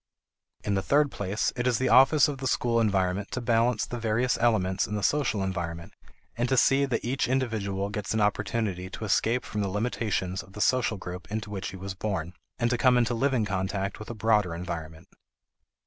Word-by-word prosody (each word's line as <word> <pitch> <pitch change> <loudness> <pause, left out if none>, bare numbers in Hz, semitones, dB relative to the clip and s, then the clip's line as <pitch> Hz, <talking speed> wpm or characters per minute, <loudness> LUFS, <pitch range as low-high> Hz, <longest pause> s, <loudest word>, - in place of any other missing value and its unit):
In 105 - -1
the 95 - +1
third 145 +5 +2
place, 100 +2 -1
it 125 -1 -1
is 120 -3 +2
the 130 - 0
office 135 +3 +6
of 145 -3 -4
the 130 - -2
school 115 -1 +1
environment 95 -2 +1
to - - -1
balance 115 -1 +2
the 120 - -5
various 115 +3 +1
elements 105 -5 +2
in 105 - -3
the 105 - -3
social 125 -9 +1
environment, 85 -3 -4 0.4
and 120 +1 -1
to 130 - +2
see 135 +2 +5
to 140 - +2
it - - -8
that 115 -2 -1
each 130 +3 0
individual 110 -7 -1
gets 105 -1 -4
an - - +1
opportunity 105 -2 -1
to 110 - -6
escape 115 +4 +1
from 105 - -3
the 100 - -1
limitations 105 -3 -1
of 95 - -17
the 105 - -9
social 120 -3 +2
group 90 +1 -8
in 110 - 0
which 105 -3 -5
he 95 - -8
was 95 +1 -5
born, 95 -4 -3 0.2
and 120 -1 +1
to 120 - 0
come 125 -1 +5
into 120 0 +2
living 130 -2 +1
contact 100 0 -2
with 110 - -9
a 120 - -5
broader 105 -5 +2
environment. 80 -2 -6
105 Hz, 210 wpm, -27 LUFS, 95-120 Hz, 0.4 s, office